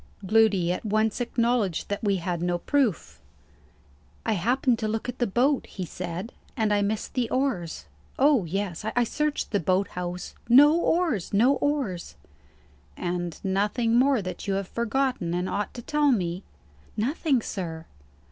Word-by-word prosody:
Gloody 200 -4 +3
at 180 - -3
once 215 +2 0
acknowledged 235 -6 0
that 205 +2 -3
we 200 -2 +2
had 175 -2 -3
no 175 0 0
proof. 245 - -1 1.0
"I 225 - +2
happened 240 +5 +1
to 220 - -1
look 220 +2 -2
at 245 - -5
the 240 - +2
boat," 255 +7 +1
he 185 - -6
said, 180 +6 -6 0.2
"and 215 -2 +2
I 205 - +2
missed 210 +1 -2
the 245 -3 0
oars. 250 -12 -1 0.3
Oh, 275 -5 +4
yes; 185 +1 -3
I 220 +3 +1
searched 300 +5 -2
the 205 - +2
boat 185 +3 +1
house. 180 0 -5 0.2
No 290 +6 +8
oars! 330 - +1
no 245 +7 +5
oars!" 270 - -2 0.8
"And 175 -1 -3
nothing 205 +4 +1
more 255 -2 +4
that 185 +1 -6
you 195 - +1
have 195 -1 -2
forgotten, 235 -6 -1
and 180 +1 -1
ought 205 +2 -2
to 240 - -7
tell 295 +1 +2
me?" 180 -5 -1 0.6
"Nothing, 270 +4 +1
sir." 165 -4 -5
215 Hz, 155 wpm, -26 LUFS, 180-250 Hz, 1.0 s, No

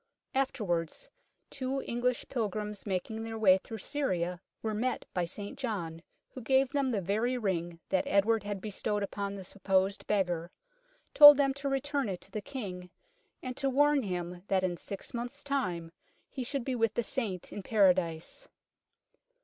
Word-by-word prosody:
Afterwards 210 - -1 0.4
two 270 0 -2
English 240 +1 -1
pilgrims 210 -3 -3
making 200 +4 -2
their 225 0 -5
way 190 -4 +6
through 225 - -8
Syria 180 -9 -1 0.2
were 220 -1 -1
met 240 +4 -1
by 180 -1 0
St 200 +4 -6
John, 175 -10 -3 0.3
who 260 - -8
gave 265 +2 +3
them 280 -2 +1
the 215 -5 0
very 220 +7 0
ring 175 -6 -2
that 190 -1 +1
Edward 215 +3 +3
had 205 -1 -4
bestowed 210 0 -2
upon 200 0 -3
the 195 - -7
supposed 195 +1 0
beggar, 175 -5 0 0.6
told 290 -1 +11
them 275 -1 +3
to 280 0 -3
return 275 -2 0
it 185 -2 -3
to 195 - -11
the 215 - -3
King, 195 -8 -6 0.5
and 255 -1 -4
to 275 - +1
warn 290 +2 +4
him 180 -4 -4
that 190 -1 +2
in 180 -1 0
six 195 +3 -8
months' 245 +4 -5
time 185 -13 -2 0.4
he 260 - -4
should 260 0 -3
be 265 - -1
with 225 -3 +1
the 240 - +1
Saint 215 -7 -3
in 205 - -5
Paradise. 185 - +1
210 Hz, 165 wpm, -31 LUFS, 185-255 Hz, 0.6 s, told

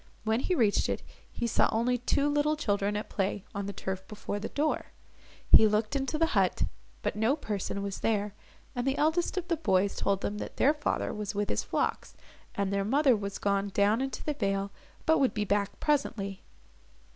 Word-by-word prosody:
When 220 +1 +1
he 365 +7 0
reached 220 -9 +2
it, - - -2 0.3
he 235 - -3
saw 230 - +3
only 245 +3 +1
two 280 +4 +1
little 295 +1 +2
children, 205 -7 0
at 210 - -4
play, 195 0 -2
on 200 -1 -3
the - - -3
turf 190 -1 -4
before 210 -1 -4
the 215 - -4
door. 300 +2 0 0.6
He 220 - +9
looked 215 +4 0
into 275 +3 -1
the 330 - +3
hut, 195 -4 +2 0.4
but - - -1
no 220 +6 +2
person 200 -7 -3
was 200 -1 -4
there, 210 -2 0 0.4
and 245 +1 -2
the 270 - +1
eldest 320 +5 +1
of 360 -1 -2
the 335 -1 0
boys 200 - +2
told 195 -1 0
him 210 +1 -2
that - - -7
their 285 - +5
father 295 -1 -1
was 210 -1 -4
with 205 0 -1
his - - 0
flocks, - - -2 0.4
and 200 -1 0
their 200 0 +1
mother 265 +4 +4
was 200 -1 -4
gone 200 0 0
down 205 +4 +3
into 270 0 -3
the 300 - -1
vale, 200 -5 -1 0.3
but 320 - +4
would 265 -4 +2
be 210 -1 0
back 200 0 0
presently. 220 -10 0
215 Hz, 200 wpm, -29 LUFS, 200-275 Hz, 0.6 s, He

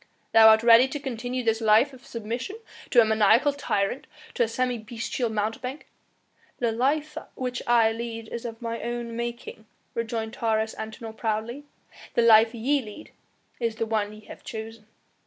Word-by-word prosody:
"Thou 225 0 +8
art 220 0 +5
ready 235 +2 +7
to 290 +2 -5
continue 250 -2 -4
this 225 0 +1
life 225 +6 +4
of 255 -1 -14
submission 235 - -5 0.3
to 240 - +6
a - - +4
maniacal 220 +6 +4
tyrant, 245 -4 -2 0.3
to - - -2
a 235 - +4
semi 245 +1 -1
bestial 230 +2 -3
mountebank 225 +6 -3 0.4
" - - -36
"The 235 -2 0
life 295 +6 0 0.2
which 250 -1 -3
I 230 -2 +4
lead 230 0 -6
is 235 - -6
of 230 0 -7
mine 230 0 -4
own 235 -1 -4
making," 235 -2 -6 0.3
rejoined 225 -1 -3
Taurus 220 -1 0
Antinor 220 +1 -7
proudly; 225 +5 -3 0.5
"the 235 - +4
life 225 0 +6
ye 275 +5 +1
lead 220 +6 -11 0.5
is 230 -2 -1
the 225 - -2
one 215 -2 -1
ye 215 0 -12
have - - -13
chosen." 220 -1 -8
230 Hz, 170 wpm, -26 LUFS, 220-245 Hz, 0.5 s, Thou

